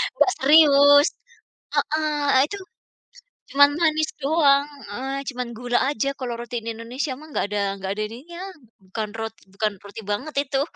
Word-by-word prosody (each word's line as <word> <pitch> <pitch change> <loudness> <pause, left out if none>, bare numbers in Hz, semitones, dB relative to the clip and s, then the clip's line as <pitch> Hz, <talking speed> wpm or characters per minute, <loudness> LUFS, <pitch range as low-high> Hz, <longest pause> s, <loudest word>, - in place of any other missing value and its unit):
enggak 380 - +4
serius, 285 0 +7 0.7
heeh, 305 +1 0 0.2
ah, 260 - +6
itu, 405 - -6 1.0
cuman 285 +1 +6
manis 310 -1 +2
doang, 280 -1 +4 0.3
eee, 265 +6 -4
cuman 250 -2 -4
gula 245 0 0
aja 275 -1 -1
kalo 250 -2 -3
roti 240 0 -7
di 230 - -3
Indonesia 245 +6 -4
mah 310 - -13
nggak - - +1
ada 205 - 0 0.2
nggak 190 0 -4
ada 215 +1 -3
ininya 295 +10 -11 0.4
bukan 205 +3 -5
roti 225 0 -6
bukan 210 +1 -1
roti 205 +2 -9
banget 255 +10 -3
itu 270 0 0
270 Hz, 155 wpm, -23 LUFS, 225-295 Hz, 1.0 s, serius